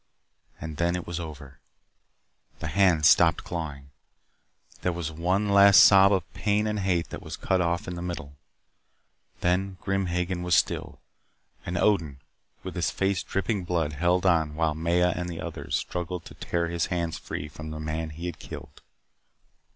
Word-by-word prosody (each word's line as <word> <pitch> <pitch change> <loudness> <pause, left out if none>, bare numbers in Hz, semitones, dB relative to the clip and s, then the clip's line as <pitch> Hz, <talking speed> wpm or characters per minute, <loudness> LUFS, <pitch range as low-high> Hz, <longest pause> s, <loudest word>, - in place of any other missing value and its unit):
And 80 -2 -7
then 85 +1 +1
it 90 - -4
was 85 0 -4
over. 75 -5 -9 1.0
The 80 - -5
hands 90 -5 +4
stopped 85 -1 +5
clawing. 75 -5 -6 0.9
There 90 - +1
was 85 -2 -4
one 90 +6 0
last 100 0 +8
sob 95 0 +7
of 90 -10 -1
pain 105 0 +1
and 105 -1 -1
hate 90 -4 0
that - - -6
was - - -7
cut 95 -1 +1
off 85 +1 -1
in 90 - -4
the 85 - -6
middle. 85 -5 -5 1.1
Then 95 +2 0
Grim 95 -1 -1
Hagen 90 +1 -2
was 90 -2 +2
still. - - 0 0.7
And 85 0 -2
Odin, 80 -9 +1 0.4
with - - -6
his - - 0
face 95 -2 0
dripping 95 0 -2
blood, 85 -4 -1
held 90 +5 +1
on 80 -4 +2
while 80 -1 +1
Maya 85 +3 +1
and 90 0 -3
the 85 -2 -6
others - - -4
struggled 90 0 -4
to - - -11
tear 85 -1 -2
his 85 -1 -1
hands 85 -3 -2
free 75 - -5
from 80 +1 -9
the 80 0 -6
man 80 +1 -3
he 80 +3 -8
had 85 -2 -5
killed. - - -10
85 Hz, 170 wpm, -26 LUFS, 80-90 Hz, 1.1 s, last